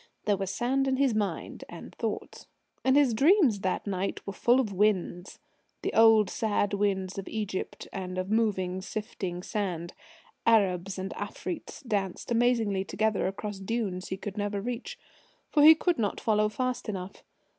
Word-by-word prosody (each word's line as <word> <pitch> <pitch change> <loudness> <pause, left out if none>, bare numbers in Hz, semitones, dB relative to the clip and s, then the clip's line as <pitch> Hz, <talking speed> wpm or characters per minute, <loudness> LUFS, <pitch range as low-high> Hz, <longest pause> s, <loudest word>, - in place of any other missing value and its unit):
There 205 - +3
was 195 -1 -3
sand 265 +6 0
in 265 - +2
his 270 -2 +2
mind 210 -2 -3
and - - -10
thoughts. - - -5 0.4
And 260 0 +4
his 280 -5 +4
dreams 280 - +4
that 185 -1 -1
night 195 -1 -3
were 200 - -5
full 245 +5 +3
of 215 -6 -1
winds, 190 -2 0 0.5
the - - -1
old 225 -2 +6
sad 205 -1 0
winds 195 -2 0
of 195 - -7
Egypt, 210 -4 -4
and 185 -1 -5
of 185 +2 -2
moving, 190 -5 +1
sifting 190 -3 -5
sand. 180 -6 -3 0.5
Arabs 195 -4 +2
and 190 +1 -4
Afreets - - -6
danced 200 -1 -2
amazingly 230 -5 +2
together 215 +1 0
across 195 +1 -5
dunes 195 -3 -2
he 190 - -4
could 200 +1 -7
never 205 0 -1
reach. 245 - -5 0.5
For 295 - +4
he 315 +2 +10
could 345 -1 0
not 205 -3 -1
follow 215 -1 +2
fast 250 +1 -2
enough. 190 -1 -6
205 Hz, 160 wpm, -28 LUFS, 190-230 Hz, 0.5 s, he